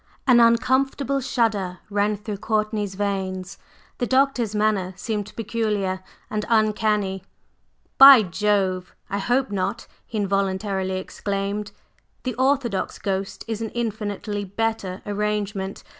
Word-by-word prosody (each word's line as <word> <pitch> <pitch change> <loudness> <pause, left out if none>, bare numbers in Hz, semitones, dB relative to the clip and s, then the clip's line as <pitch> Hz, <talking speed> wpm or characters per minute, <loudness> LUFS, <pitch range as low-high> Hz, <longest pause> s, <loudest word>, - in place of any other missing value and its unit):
An 245 -2 +6
uncomfortable 260 +4 +3
shudder 220 -8 0
ran 205 +1 +1
through 210 0 -5
Courtney's 210 -1 -1
veins; 190 -2 -3 0.4
the 245 - 0
Doctor's 260 -5 +2
manner 205 -3 +1
seemed 210 +2 -3
peculiar 210 -4 -1 0.3
and 215 0 -2
uncanny. 210 -3 +1 0.8
"By 270 -4 +11
Jove! 190 -1 0 0.2
I 200 - -1
hope 250 +4 +1
not!" 200 +3 -2 0.2
he 225 - -5
involuntarily 195 -1 0
exclaimed. 200 +2 -3 0.5
"The 255 - -2
orthodox 260 -4 0
ghost 195 0 -3
is 225 -1 -3
an 225 - -2
infinitely 210 -2 -3
better 200 -2 -3
arrangement. 205 -1 -2
210 Hz, 115 wpm, -23 LUFS, 195-225 Hz, 0.8 s, By